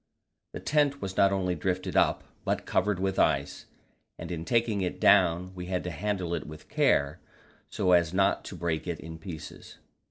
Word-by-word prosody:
The -, -, -5 dB
tent 145 Hz, -2 st, +1 dB
was 95 Hz, -5 st, -5 dB
not 100 Hz, 0 st, +4 dB
only 95 Hz, -2 st, 0 dB
drifted 90 Hz, +2 st, -2 dB
up, -, -, +3 dB, 0.2 s
but -, -, -1 dB
covered 95 Hz, 0 st, +1 dB
with 95 Hz, 0 st, -1 dB
ice, 70 Hz, -2 st, +1 dB, 0.5 s
and -, -, -7 dB
in 85 Hz, -1 st, -4 dB
taking 115 Hz, -1 st, +1 dB
it 90 Hz, -, -3 dB
down 90 Hz, -1 st, +4 dB
we 90 Hz, -1 st, -7 dB
had 90 Hz, -1 st, -2 dB
to 90 Hz, -, -4 dB
handle 95 Hz, 0 st, -2 dB
it 80 Hz, -4 st, -3 dB
with 75 Hz, 0 st, -11 dB
care. 70 Hz, 0 st, +2 dB, 0.5 s
so 90 Hz, -, 0 dB
as 85 Hz, -2 st, +4 dB
not 95 Hz, +2 st, +2 dB
to -, -, -7 dB
break 85 Hz, -1 st, -2 dB
it 85 Hz, -3 st, -3 dB
in 80 Hz, 0 st, -9 dB
pieces. 80 Hz, -3 st, -9 dB
90 Hz, 185 wpm, -28 LUFS, 80-95 Hz, 0.5 s, not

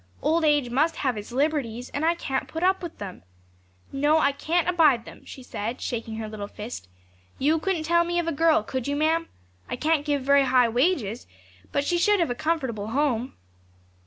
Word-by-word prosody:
Old 325 Hz, +1 st, +2 dB
age 295 Hz, -5 st, +2 dB
must 310 Hz, +6 st, +2 dB
have 260 Hz, -4 st, -1 dB
its 210 Hz, +2 st, -7 dB
liberties; 255 Hz, -3 st, -1 dB
and 285 Hz, -, -3 dB
I 335 Hz, +1 st, +3 dB
can't 270 Hz, -5 st, -3 dB
put 325 Hz, +2 st, -5 dB
up 375 Hz, +1 st, +3 dB
with 345 Hz, -2 st, -7 dB
them. 195 Hz, -3 st, -8 dB, 0.7 s
No, 290 Hz, +3 st, +3 dB
I 285 Hz, -3 st, +3 dB
can't 330 Hz, +5 st, 0 dB
abide 305 Hz, -10 st, +4 dB
them,' -, -, -13 dB
she 260 Hz, -, -10 dB
said, 230 Hz, +1 st, -5 dB
shaking 230 Hz, -2 st, -4 dB
her 220 Hz, 0 st, -5 dB
little 210 Hz, -1 st, -6 dB
fist. 210 Hz, -, -8 dB, 0.5 s
'You 310 Hz, +4 st, +2 dB
couldn't 345 Hz, -1 st, -1 dB
tell 340 Hz, +2 st, +3 dB
me 345 Hz, 0 st, -2 dB
of 345 Hz, -1 st, 0 dB
a -, -, +1 dB
girl, 320 Hz, -5 st, +3 dB
could 260 Hz, +3 st, -4 dB
you, 285 Hz, -, -1 dB
ma'am? 320 Hz, +2 st, +1 dB, 0.4 s
I -, -, -2 dB
can't 305 Hz, +3 st, +1 dB
give 290 Hz, -2 st, -1 dB
very 280 Hz, 0 st, +4 dB
high 250 Hz, -2 st, +4 dB
wages, 245 Hz, -, 0 dB, 0.4 s
but 285 Hz, -, 0 dB
she 345 Hz, +4 st, 0 dB
should 415 Hz, +3 st, +3 dB
have 335 Hz, -7 st, +1 dB
a -, -, +1 dB
comfortable 265 Hz, -8 st, -2 dB
home.' 255 Hz, -1 st, -1 dB
285 Hz, 200 wpm, -25 LUFS, 245-325 Hz, 0.7 s, abide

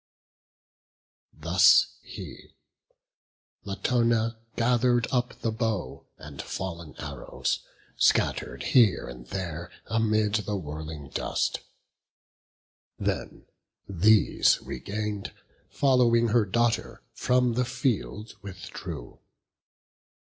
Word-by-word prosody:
Thus -, -, +5 dB, 0.2 s
he: -, -, -10 dB, 1.1 s
Latona 115 Hz, +2 st, +1 dB, 0.2 s
gather'd 120 Hz, 0 st, +3 dB
up 125 Hz, -1 st, -1 dB
the 115 Hz, -, 0 dB
bow, 110 Hz, -, -3 dB
And 70 Hz, -2 st, -8 dB
fallen 85 Hz, -4 st, -6 dB
arrows, -, -, -3 dB, 0.4 s
scatter'd -, -, +2 dB
here 115 Hz, -8 st, +4 dB
and -, -, -10 dB
there 85 Hz, +1 st, -5 dB, 0.2 s
Amid 110 Hz, -2 st, +1 dB
the 105 Hz, -1 st, 0 dB
whirling 75 Hz, -4 st, -6 dB
dust; -, -, -1 dB, 1.4 s
then, -, -, -3 dB, 0.4 s
these 100 Hz, +3 st, +4 dB
regain'd, 105 Hz, -, -4 dB, 0.4 s
Following 120 Hz, -4 st, +3 dB
her 110 Hz, -1 st, +3 dB
daughter, 120 Hz, +4 st, 0 dB
from 125 Hz, -1 st, +2 dB
the 125 Hz, +2 st, +1 dB
field 120 Hz, -4 st, -2 dB
withdrew. 90 Hz, -10 st, -8 dB
110 Hz, 85 wpm, -27 LUFS, 90-120 Hz, 1.4 s, Thus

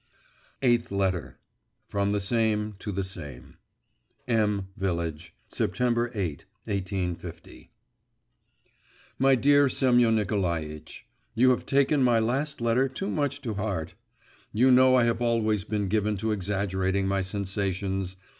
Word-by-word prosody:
EIGHTH 120 Hz, -4 st, +2 dB
LETTER 90 Hz, -10 st, -1 dB, 0.5 s
From 100 Hz, 0 st, 0 dB
the 105 Hz, -, +1 dB
SAME 105 Hz, 0 st, 0 dB
to 105 Hz, -, -5 dB
the 100 Hz, 0 st, -2 dB
SAME 85 Hz, -9 st, -8 dB, 0.7 s
M 105 Hz, -4 st, +1 dB
VILLAGE, 85 Hz, -3 st, -3 dB
September 120 Hz, +4 st, 0 dB
8, 90 Hz, -8 st, -3 dB, 0.2 s
1850. 90 Hz, -4 st, -5 dB, 1.5 s
My 135 Hz, 0 st, +5 dB
dear 145 Hz, +2 st, +4 dB
Semyon 120 Hz, -4 st, +3 dB
Nikolaitch, 85 Hz, -8 st, -3 dB, 0.3 s
You 130 Hz, +3 st, +5 dB
have 125 Hz, -, -1 dB
taken 140 Hz, +1 st, +3 dB
my 120 Hz, -2 st, +4 dB
last 130 Hz, +5 st, -1 dB
letter 120 Hz, +3 st, +2 dB
too 165 Hz, +9 st, -4 dB
much 145 Hz, -1 st, -1 dB
to 115 Hz, -4 st, -3 dB
heart. 100 Hz, -6 st, -3 dB, 0.6 s
You 125 Hz, +5 st, +4 dB
know 130 Hz, 0 st, +6 dB
I 125 Hz, -, +5 dB
have 115 Hz, 0 st, 0 dB
always 110 Hz, -4 st, +1 dB
been 105 Hz, -2 st, -2 dB
given 105 Hz, +1 st, 0 dB
to 110 Hz, +3 st, -1 dB
exaggerating 95 Hz, -1 st, -1 dB
my 95 Hz, 0 st, +1 dB
sensations. 95 Hz, -1 st, -2 dB
105 Hz, 125 wpm, -27 LUFS, 95-120 Hz, 1.5 s, know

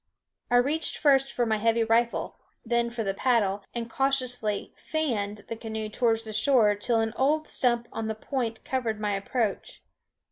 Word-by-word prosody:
I 245 Hz, -, +2 dB
reached 285 Hz, +6 st, +2 dB
first 270 Hz, -2 st, +3 dB
for 240 Hz, -, 0 dB
my 220 Hz, -1 st, +1 dB
heavy 230 Hz, +1 st, +2 dB
rifle, 230 Hz, +1 st, +1 dB, 0.3 s
then 235 Hz, 0 st, +1 dB
for 235 Hz, -1 st, -3 dB
the 195 Hz, -2 st, -1 dB
paddle, 205 Hz, -3 st, +1 dB
and 235 Hz, -1 st, -4 dB
cautiously 250 Hz, -5 st, -1 dB
"fanned" 210 Hz, -10 st, -3 dB
the 230 Hz, -, -4 dB
canoe 220 Hz, -1 st, -5 dB
towards 225 Hz, 0 st, +1 dB
shore 220 Hz, -2 st, +4 dB
till 225 Hz, +3 st, +1 dB
an 225 Hz, 0 st, -1 dB
old 305 Hz, +4 st, +2 dB
stump 240 Hz, -2 st, +1 dB
on 225 Hz, -1 st, -3 dB
the 220 Hz, -, -2 dB
point 230 Hz, -1 st, -4 dB
covered 235 Hz, -5 st, -2 dB
my 210 Hz, -1 st, -1 dB
approach. 205 Hz, +2 st, -2 dB
230 Hz, 165 wpm, -27 LUFS, 220-255 Hz, 0.3 s, shore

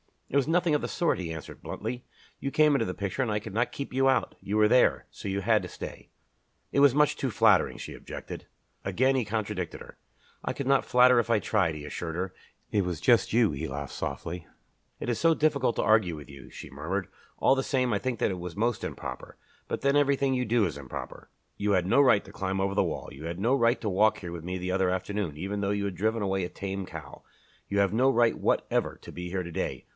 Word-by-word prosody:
"It -, -, -5 dB
was 140 Hz, -, +2 dB
nothing 170 Hz, 0 st, +2 dB
of 150 Hz, -, +2 dB
the -, -, -2 dB
sort," 170 Hz, -, 0 dB
he 85 Hz, -3 st, -4 dB
answered 80 Hz, -2 st, -8 dB
bluntly. 125 Hz, 0 st, -5 dB, 0.3 s
"You 140 Hz, -, -2 dB
came 150 Hz, 0 st, +4 dB
into 140 Hz, -, +2 dB
the 90 Hz, -, -3 dB
picture 100 Hz, +2 st, -3 dB
and 125 Hz, -, 0 dB
I 105 Hz, -, +1 dB
could 105 Hz, -1 st, -6 dB
not 120 Hz, +3 st, 0 dB
keep 140 Hz, -, -5 dB
you 135 Hz, +1 st, +3 dB
out. 135 Hz, -, +2 dB
You 100 Hz, -, -4 dB
were 105 Hz, 0 st, +5 dB
there, 110 Hz, -, +4 dB
so -, -, -8 dB
you 100 Hz, 0 st, -1 dB
had 110 Hz, +1 st, +3 dB
to -, -, -6 dB
stay." -, -, -9 dB, 0.6 s
"It -, -, +2 dB
was 140 Hz, -2 st, +6 dB
much 150 Hz, 0 st, +3 dB
too -, -, -1 dB
flattering," -, -, +4 dB
she -, -, -7 dB
objected. -, -, -8 dB, 0.4 s
Again 130 Hz, +8 st, +2 dB
he 125 Hz, -4 st, +1 dB
contradicted 105 Hz, -4 st, -3 dB
her. -, -, -12 dB, 0.5 s
"I -, -, -2 dB
could 140 Hz, -, -4 dB
not 135 Hz, +1 st, +3 dB
flatter 125 Hz, 0 st, +6 dB
if 115 Hz, -, -1 dB
I 115 Hz, -2 st, +4 dB
tried," 95 Hz, -7 st, +1 dB
he 75 Hz, -, -7 dB
assured 80 Hz, +1 st, -5 dB
her. 90 Hz, +1 st, -3 dB, 0.4 s
"It 105 Hz, -2 st, +2 dB
was 90 Hz, -3 st, -3 dB
just 120 Hz, -4 st, +4 dB
you." 110 Hz, -9 st, +3 dB
She 80 Hz, +4 st, -3 dB
laughed 70 Hz, 0 st, -5 dB
softly. 85 Hz, 0 st, -5 dB, 0.5 s
"It -, -, -3 dB
is 120 Hz, -, 0 dB
so 165 Hz, 0 st, +5 dB
difficult 140 Hz, -7 st, +1 dB
to -, -, 0 dB
argue 110 Hz, -6 st, +3 dB
with 75 Hz, -1 st, -11 dB
you," 70 Hz, -1 st, -12 dB
she -, -, -10 dB
murmured. -, -, -3 dB, 0.3 s
"All -, -, +4 dB
the 135 Hz, -, +1 dB
same, 130 Hz, -2 st, 0 dB
I 100 Hz, -, +1 dB
think 130 Hz, 0 st, -2 dB
that -, -, +2 dB
it 90 Hz, -, -4 dB
was 90 Hz, -1 st, -6 dB
most 115 Hz, +3 st, 0 dB
improper. 65 Hz, -, -7 dB, 0.3 s
But -, -, -3 dB
then 140 Hz, +1 st, +3 dB
everything 140 Hz, -1 st, +2 dB
you 125 Hz, -1 st, 0 dB
do 115 Hz, -1 st, +3 dB
is 80 Hz, -6 st, -3 dB
improper. 70 Hz, -3 st, -8 dB, 0.3 s
You 105 Hz, 0 st, 0 dB
had 90 Hz, -2 st, +2 dB
no 95 Hz, -, +3 dB
right 115 Hz, -7 st, +5 dB
to 100 Hz, -, -13 dB
climb 95 Hz, -1 st, -2 dB
over 95 Hz, 0 st, 0 dB
that -, -, +3 dB
wall, -, -, -3 dB
you 75 Hz, +4 st, -9 dB
had 85 Hz, +1 st, -4 dB
no 115 Hz, +7 st, +2 dB
right 120 Hz, -2 st, +3 dB
to 110 Hz, -, -1 dB
walk 105 Hz, +3 st, +3 dB
here 90 Hz, -2 st, -7 dB
with 85 Hz, -1 st, -7 dB
me 90 Hz, +1 st, -3 dB
the 90 Hz, 0 st, -3 dB
other 95 Hz, 0 st, +2 dB
afternoon, 95 Hz, -3 st, -2 dB
even 100 Hz, +5 st, -3 dB
though 100 Hz, 0 st, 0 dB
you 100 Hz, 0 st, -1 dB
had 100 Hz, -2 st, -3 dB
driven 110 Hz, +4 st, 0 dB
away 95 Hz, -2 st, 0 dB
a -, -, -6 dB
tame 95 Hz, -1 st, -5 dB
cow. -, -, -9 dB, 0.5 s
You 100 Hz, -, 0 dB
have 100 Hz, -1 st, +2 dB
no 130 Hz, +4 st, +4 dB
right 120 Hz, -3 st, +3 dB
whatever -, -, 0 dB
to -, -, -10 dB
be 90 Hz, 0 st, -6 dB
here 90 Hz, 0 st, -2 dB
to 85 Hz, -, -7 dB
day. 95 Hz, +3 st, -3 dB
105 Hz, 250 wpm, -28 LUFS, 90-125 Hz, 0.6 s, was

